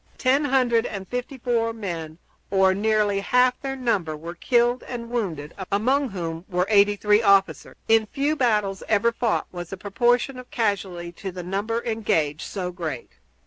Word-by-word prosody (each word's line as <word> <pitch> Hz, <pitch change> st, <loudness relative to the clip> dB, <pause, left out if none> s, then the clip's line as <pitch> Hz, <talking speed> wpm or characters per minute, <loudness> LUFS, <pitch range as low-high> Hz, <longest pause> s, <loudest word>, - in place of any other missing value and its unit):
Ten 275 Hz, +3 st, +2 dB
hundred 250 Hz, -4 st, +2 dB
and 195 Hz, -2 st, -6 dB
fifty 250 Hz, +2 st, -4 dB
four 230 Hz, -2 st, 0 dB
men, 170 Hz, -7 st, -5 dB, 0.3 s
or 190 Hz, -1 st, +4 dB
nearly 210 Hz, 0 st, +1 dB
half 250 Hz, +5 st, +2 dB
their 270 Hz, -1 st, -3 dB
number, 200 Hz, -12 st, -1 dB
were 165 Hz, +3 st, -7 dB
killed 240 Hz, +6 st, +2 dB
and 235 Hz, -2 st, -6 dB
wounded, 170 Hz, -11 st, -3 dB, 0.2 s
among 255 Hz, +7 st, +2 dB
whom 165 Hz, -4 st, -5 dB
were 180 Hz, -1 st, +1 dB
83 205 Hz, 0 st, +4 dB
officers. 195 Hz, -3 st, +2 dB
In 225 Hz, -1 st, +4 dB
few 285 Hz, +5 st, 0 dB
battles 210 Hz, -8 st, +1 dB
ever 220 Hz, +2 st, +3 dB
fought 230 Hz, -1 st, 0 dB
was 175 Hz, -2 st, -7 dB
the 195 Hz, -, -6 dB
proportion 240 Hz, +6 st, +1 dB
of 250 Hz, -, -11 dB
casualties 190 Hz, -6 st, -2 dB
to 195 Hz, -, -5 dB
the 180 Hz, 0 st, -7 dB
number 205 Hz, +6 st, -2 dB
engaged 165 Hz, -10 st, 0 dB
so 180 Hz, -3 st, -4 dB
great. 160 Hz, -8 st, -5 dB
210 Hz, 160 wpm, -24 LUFS, 185-240 Hz, 0.3 s, or